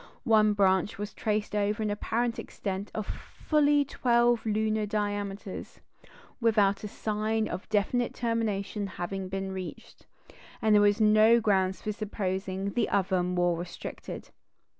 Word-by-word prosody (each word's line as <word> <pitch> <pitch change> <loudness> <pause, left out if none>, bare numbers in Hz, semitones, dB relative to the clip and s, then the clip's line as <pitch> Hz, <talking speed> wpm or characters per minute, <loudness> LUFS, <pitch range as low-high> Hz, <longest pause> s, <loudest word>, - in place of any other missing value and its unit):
One 215 -3 +4
branch 195 0 +2
was 205 +1 -5
traced 210 -1 -2
over 210 +1 0
an 210 - 0
apparent 230 +3 -1
extent 195 0 -5
of 215 - -2
fully 290 -2 +1
twelve 240 -3 +2
lunar 215 0 0
diameters, 205 -2 -4 0.6
without 210 -4 +3
sign 215 +1 -2
of 180 +2 -5
a - - -36
definite 225 +4 0
termination 215 -3 -1
having 185 +2 -4
been 195 0 -3
reached; 190 -1 -8 0.5
and 220 -2 +3
there 210 - +6
were 205 0 +6
no 215 +2 +6
grounds 190 -3 +1
for 215 - -1
supposing 195 -2 -3
the 240 -3 +1
other 190 -2 +1
more 175 -1 +1
restricted. 175 +1 -7
210 Hz, 135 wpm, -28 LUFS, 195-220 Hz, 0.6 s, there